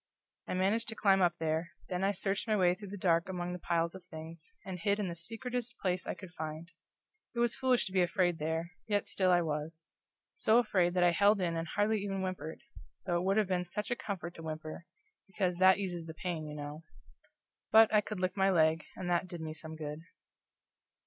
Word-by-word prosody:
I - - -2
managed 200 +5 +1
to 225 - -4
climb 195 -3 +4
up 175 -1 +3
there, 160 +1 -1
then 180 0 -2
I 195 - +3
searched 195 +2 -1
my 215 - +3
way 180 -3 +4
through 200 +3 -9
the 200 +2 -6
dark 170 -2 +2
among 180 -1 -3
the 180 - -5
piles 170 -1 0
of 190 -1 -10
things, 160 -1 -9
and 185 -2 -5
hid 200 +4 +1
in 205 -3 -1
the - - -3
secretest 235 +7 -4
place 180 -2 -1
I - - -2
could 185 -3 -11
find. 160 +2 -6 0.6
It - - -2
was 240 -1 +3
foolish 255 -2 +2
to 190 - -5
be 185 -1 +3
afraid 175 -1 +2
there, 160 +2 -2 0.2
yet 205 -2 +1
still 185 -2 +1
I 175 -1 +5
was; 160 +1 -4 0.5
so 235 - +3
afraid 185 -7 +2
that 180 - +4
I 175 - +6
held 200 +4 +4
in 170 -2 0
and 165 0 -2
hardly 210 +4 +1
even 195 -1 -2
whimpered, 185 -4 -4 0.4
though 175 -2 +1
it 175 - -1
would 195 +2 +2
have 215 -3 +3
been 180 -1 -1
such 210 +5 -4
a - - +2
comfort 190 -8 -5
to 165 - -10
whimper, 155 +1 -6 0.4
because 185 -2 -1
that 185 +1 +6
eases 180 -4 -3
the 160 - -7
pain, 165 -3 -3
you 150 - -6
know. 145 +1 -6 0.9
But 220 0 +7
I 210 - +6
could 210 -1 -5
lick 185 0 0
my 195 -1 +3
leg, 160 -3 +3
and 185 - -5
that 175 +1 +1
did 170 -2 -7
some 160 0 -7
good. 150 -1 -5
180 Hz, 220 wpm, -32 LUFS, 165-200 Hz, 0.9 s, But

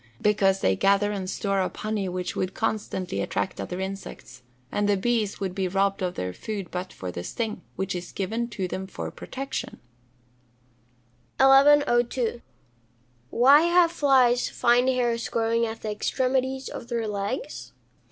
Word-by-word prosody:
_ - - -32 0.2
Because 195 -2 +2
they 95 - +3
gather 200 - +3
and 190 -2 -4
store 195 0 -1
up 185 - -3
honey 210 -3 -2
which 180 0 -4
would 185 0 -2
constantly 210 -4 -2
attract 190 - -2
other 180 - -5
insects, 190 -9 -7 0.3
and 205 0 0
the 200 - +3
bees 220 -1 0
would 190 -2 -3
be 190 -1 -1
robbed 195 +2 0
of 180 -1 -2
their 90 0 -3
food 200 - -6
but 180 +1 -4
for 90 -1 -6
the 85 0 -6
sting, 220 - -4
which 190 0 -2
is 175 -1 -6
given 225 +5 -2
to 195 -5 -4
them 190 +1 -5
for - - -6
protection. 270 0 -6 1.6
1102. 270 -4 +4 0.9
_Why 285 +7 +6
have 345 -1 +5
flies 260 -6 +3
fine 245 +2 +3
hairs 240 -2 0
growing 230 0 +1
at 225 0 -7
the 215 - -2
extremities 260 +4 -1
of - - -7
their 235 -2 -2
legs? 210 +8 -4
215 Hz, 155 wpm, -26 LUFS, 190-245 Hz, 1.6 s, Why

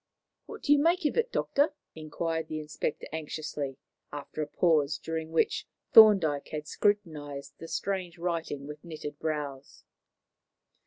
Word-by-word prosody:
"What 440 -1 -9
do 290 - +5
you 290 - +4
make 335 +3 +3
of 295 - +2
it, 470 +1 +1
Doctor?" 290 +2 +1 0.2
inquired 160 +1 -3
the 155 -1 -4
inspector 150 0 -3
anxiously, 150 -3 -4 0.3
after 145 +1 -6
a 150 - -2
pause, 150 -2 +2
during 160 +1 -4
which 165 - +1 0.3
Thorndyke 190 -10 +7
had 150 -1 -5
scrutinized 145 -9 -1
the 165 - -8
strange 185 -1 -3
writing 165 -5 -3
with 150 +1 -9
knitted 150 -3 -7
brows. 145 -3 -4
160 Hz, 140 wpm, -29 LUFS, 145-180 Hz, 0.3 s, Thorndyke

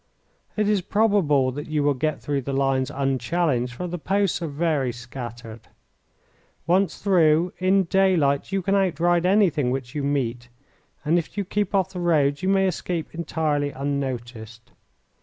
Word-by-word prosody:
It 210 -1 +1
is 210 -2 +2
probable 185 -10 +2
that 145 +3 -7
you 150 -2 0
will 145 0 +3
get 155 +3 -2
through 140 -1 -1
the 135 +2 -5
lines 135 -1 +1
unchallenged, 135 -1 -1
for 180 - -5
the 175 0 -5
posts 195 +1 0
are 165 - -2
very 145 -3 0
scattered. 120 -2 -9 1.0
Once 185 +4 +1
through, 170 -3 +3
in 190 +1 +3
daylight 170 -7 +2
you 195 -1 -1
can 195 - 0
outride 175 -2 +2
anything 185 -9 +3
which 125 -1 -4
you 150 - -2
meet, 125 -4 -2 0.6
and 165 +4 +3
if 170 - -8
you 200 - -1
keep 205 +1 -1
off 190 -1 +1
the 180 - -5
roads 150 -4 +2
you 190 - 0
may 195 0 +3
escape 175 -2 -3
entirely 155 -3 -1
unnoticed. 125 -5 -5
150 Hz, 160 wpm, -24 LUFS, 135-180 Hz, 1.0 s, will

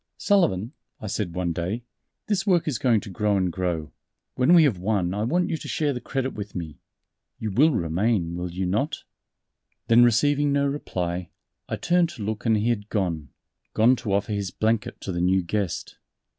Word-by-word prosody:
"Sullivan," 130 - +2 0.3
I 115 - -8
said 95 -4 -3
one 90 -2 -1
day, 95 +8 -3 0.4
"this 205 -2 -1
work 175 -4 +3
is 130 -8 -1
going 115 -5 +3
to 105 - -9
grow 105 +2 +1
and 90 -2 +1
grow.... 85 -4 -2 0.4
When 130 +8 +4
we 165 - +8
have 125 -12 +2
won 95 -2 0
I 105 - -2
want 175 +11 +1
you 160 - 0
to - - -9
share 150 -2 0
the 125 - -5
credit 135 +1 -2
with 105 -1 -7
me 80 -4 -6 0.6
you 110 -2 -3
will 145 +11 +5
remain, 85 - 0
will 90 0 -3
you 90 +2 -3
not?" 135 - -1 0.9
Then 115 +1 +7
receiving 145 +5 +3
no 140 0 +2
reply, 90 - -3 0.4
I - - -1
turned 175 -1 +2
to 120 -10 -8
look 110 +3 -3
and 110 -1 +4
he 110 +3 +1
had 105 -3 -2
gone 85 -9 -2 0.5
gone 120 +4 +5
to 105 -4 -3
offer 100 +2 0
his 100 -2 -2
blanket 110 +2 -1
to 95 - -4
the 85 -1 -2
new 95 +1 +3
guest. 95 0 -3
105 Hz, 195 wpm, -25 LUFS, 90-130 Hz, 0.9 s, we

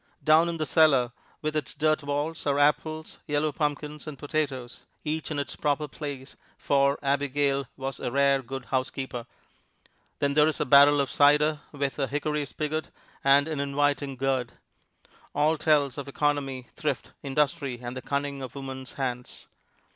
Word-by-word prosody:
Down 160 +2 +5
in 170 - -3
the 155 - -1
cellar, 140 -7 +4 0.3
with 155 0 -1
its 155 - -2
dirt 155 0 +2
walls, 145 +3 -2
are 140 0 +2
apples, 155 +2 +1
yellow 150 +1 +1
pumpkins 150 +1 -3
and 150 -2 -6
potatoes 140 -4 -3 0.2
each 155 0 -2
in 155 - -3
its 140 - -3
proper 150 0 0
place, 140 -2 -7 0.2
for 140 0 +2
Abigail 140 -1 +1
was 135 0 -4
a 125 - -3
rare 140 0 +3
good 135 0 -7
housekeeper. 130 -2 -2 0.9
Then 140 0 +1
there 150 +1 +5
is 155 - -1
a - - +1
barrel 145 +2 +7
of 140 - 0
cider, 150 +1 +4
with 140 -1 -3
a 135 - +1
hickory 150 +1 -1
spigot 155 +2 -3 0.3
and 140 +2 +5
an 155 -3 -3
inviting 140 0 0
gourd. 130 -2 -1 0.8
All 150 +2 +3
tells 145 -4 +2
of 140 - -6
economy, 140 -3 -1
thrift, - - -3
industry 140 -1 0
and 120 +1 -6
the 130 - -5
cunning 140 0 -2
of 130 0 -7
woman's 135 -1 -7
hands. 125 -2 -4
145 Hz, 160 wpm, -27 LUFS, 135-150 Hz, 0.9 s, barrel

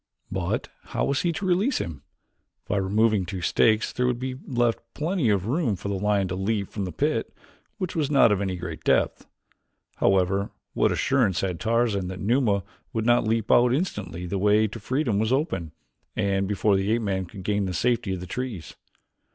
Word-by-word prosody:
But - - -2 0.2
how - - -1
was 140 - +1
he 175 - +1
to 190 +5 -4
release 190 +9 +2
him? 80 -6 -4 0.7
By 105 - 0
removing 105 +1 +2
two 90 +1 -5
stakes 110 +4 +2
there 125 0 +1
would 125 -1 0
be 130 +1 -3
left 120 -3 +1 0.2
plenty 160 - 0
of 100 -3 +1
room 125 - 0
for 100 +2 -5
the - - -1
lion 100 -1 +1
to 90 - -2
leap 100 +1 -1
from 100 -2 -3
the 90 - -4
pit, 80 - -1 0.5
which 185 -3 -4
was 150 -4 0
not 135 -6 +5
of 100 -1 +1
any 95 -2 -1
great 85 -2 -6
depth. - - +1 0.7
However, 95 +1 +2 0.2
what - - +2
assurance 115 -9 +2
had 90 -4 -2
Tarzan 115 -4 +1
that 95 0 -6
Numa 105 -3 +2 0.3
would 110 -1 -1
not 120 -2 +3
leap 110 -1 0
out 120 +1 +5
instantly 90 - -3
the 95 +2 -2
way 105 +2 +4
to 115 - -8
freedom 120 -1 0
was 110 +2 0
open, 115 - -1 0.4
and 100 -2 +1
before 105 0 +2
the 95 +2 0
ape 115 0 0
man 95 -3 -1
could 95 +2 -10
gain 100 +1 0
the 95 - -2
safety 120 -2 +1
of 90 - -7
the - - -6
trees? 115 -4 -5
105 Hz, 195 wpm, -25 LUFS, 95-120 Hz, 0.7 s, not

